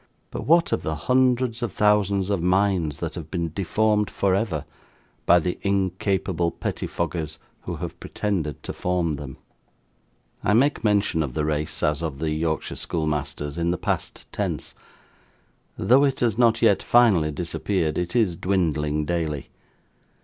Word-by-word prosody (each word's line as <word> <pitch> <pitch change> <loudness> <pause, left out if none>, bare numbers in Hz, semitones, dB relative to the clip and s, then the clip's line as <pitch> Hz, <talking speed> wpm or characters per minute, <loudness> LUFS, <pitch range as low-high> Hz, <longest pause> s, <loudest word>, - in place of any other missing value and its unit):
But, - - -5
what 170 +2 +4
of - - +1
the 80 - -2
hundreds 125 - +2
of 120 -4 -2
thousands 100 -1 +2
of 100 -4 0
minds 90 -4 +1
that - - -3
have 80 -3 -7
been 85 -2 -2
deformed 105 +3 +1
for 100 -2 +1
ever 95 -7 -1 0.6
by 90 - +7
the 90 +1 -1
incapable 95 -2 0
pettifoggers 85 -2 -3 0.3
who - - -3
have - - -6
pretended 85 -9 -3
to - - -5
form 85 -4 -1
them! 70 -2 -8 1.1
I 105 - +2
make 135 +3 +3
mention 100 -6 +2
of 70 -5 -3
the 75 - 0
race, 75 0 -2
as 75 +1 +1
of 80 -5 -3
the 80 +1 -2
Yorkshire 80 0 -2
schoolmasters, 75 -1 -2
in 85 0 +1
the 90 - 0
past - - -3
tense. - - -3 1.0
Though 130 +4 +4
it 135 -2 -1
has 115 -4 +2
not 115 -1 +3
yet 105 -4 +5
finally 105 -10 +4
disappeared, 85 +1 -1
it 90 +6 -3
is 105 -8 +2
dwindling 75 -5 0
daily. 80 -4 -2
90 Hz, 150 wpm, -24 LUFS, 80-105 Hz, 1.1 s, by